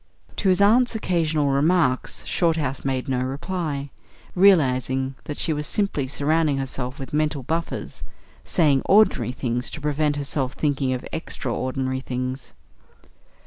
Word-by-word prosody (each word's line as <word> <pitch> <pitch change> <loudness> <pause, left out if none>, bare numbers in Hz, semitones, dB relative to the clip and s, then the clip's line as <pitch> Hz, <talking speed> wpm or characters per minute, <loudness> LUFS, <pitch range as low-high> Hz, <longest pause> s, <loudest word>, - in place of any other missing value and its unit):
To 195 - +1
his 185 +1 +3
aunt's 235 +4 +4
occasional 160 -7 +1
remarks 140 -2 +1
Shorthouse 160 -6 0
made 130 -2 -1
no 130 -2 0
reply, 145 0 -3 0.4
realising 135 -8 +3
that 150 -2 -5
she 160 - 0
was 150 0 -2
simply 195 -10 -1
surrounding 150 +1 +1
herself 130 -1 -4
with 135 0 -8
mental 150 -2 0
buffers 165 +5 -3 0.4
saying 145 -6 +3
ordinary 205 - +4
things 125 -1 -2
to - - -7
prevent 150 0 0
herself 140 -2 -2
thinking 140 -3 0
of 125 - -4
extra 130 -6 -3
ordinary 130 +1 -2
things. 130 0 -5
145 Hz, 135 wpm, -23 LUFS, 130-165 Hz, 0.4 s, aunt's